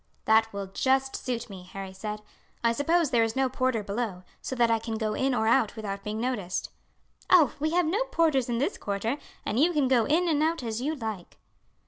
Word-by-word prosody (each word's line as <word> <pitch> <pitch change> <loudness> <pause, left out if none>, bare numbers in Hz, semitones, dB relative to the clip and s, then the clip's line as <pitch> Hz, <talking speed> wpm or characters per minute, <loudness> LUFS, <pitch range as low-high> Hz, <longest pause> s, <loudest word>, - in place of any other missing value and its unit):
"That 220 0 +4
will 200 -1 -4
just 265 +7 +1
suit 240 -2 -3
me," 195 -4 -9
Harry 195 -1 -6
said. 210 +2 -6 0.4
"I 230 - +4
suppose 305 +5 +1
there 235 - +4
is 225 0 -1
no 265 -1 +2
porter 255 -4 0
below, 200 -3 -3 0.2
so 260 - -4
that 235 -2 +3
I 225 - +3
can 225 0 -4
go 215 -1 -1
in 265 +3 +1
or 220 - +1
out 230 -1 +3
without 200 -3 -5
being 210 +1 -3
noticed." 225 -7 -2 0.6
"Oh, 330 -8 +6
we 310 +2 +1
have 355 0 +3
no 405 +10 +1
porters 320 - +1
in 235 - 0
this 285 - -1
quarter, 210 +6 -2 0.3
and 225 - 0
you 330 +5 +4
can 290 -4 +2
go 250 -4 +3
in 335 +5 +2
and 305 -3 +2
out 320 -2 +1
as 225 0 -3
you 305 +4 -1
like." 220 - -6
240 Hz, 215 wpm, -27 LUFS, 215-280 Hz, 0.6 s, Oh